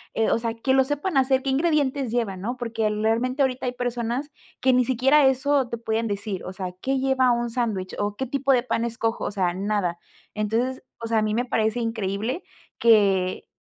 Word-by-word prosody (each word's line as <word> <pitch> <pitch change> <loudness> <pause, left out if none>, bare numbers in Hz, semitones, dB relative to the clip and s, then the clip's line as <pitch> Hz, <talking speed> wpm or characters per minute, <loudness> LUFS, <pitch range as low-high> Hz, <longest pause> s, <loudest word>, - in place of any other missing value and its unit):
eh, 225 - +2
o - - +2
sea, 230 -1 -3
que 260 +3 0
lo 265 0 +5
sepan 290 +6 -2
hacer, 265 0 +3
qué 270 - 0
ingredientes 280 -3 +1
lleva, 225 -5 -1
¿no? 230 +7 -4
Porque, 230 -3 -1
realmente, 225 +6 +1
ahorita 260 -1 -1
hay 245 - -1
personas 245 +3 -3 0.3
que 260 0 +3
ni 250 0 +4
siquiera 270 +3 +4
eso 270 0 +2
te 235 - -3
pueden 225 0 -1
decir, 200 -2 -4
o 185 - -6
sea, 185 -1 -5
¿qué 270 +1 0
lleva 265 -1 +2
un 240 0 0
sándwich? 215 -6 -2
¿O 205 0 -1
qué 265 - -3
tipo 275 +1 0
de 250 -2 +3
pan 230 -2 -1
escojo? 230 -1 -2
O - - -2
sea, 185 -4 0
nada. 190 -3 -1 0.3
Entonces, 225 +5 -1 0.2
o 230 - -5
sea, 225 -1 +2
a - - +1
mí 215 0 0
me 245 +2 0
parece 220 -1 0
increíble 225 - -2 0.4
que 195 -5 +3
235 Hz, 205 wpm, -24 LUFS, 215-260 Hz, 0.4 s, lo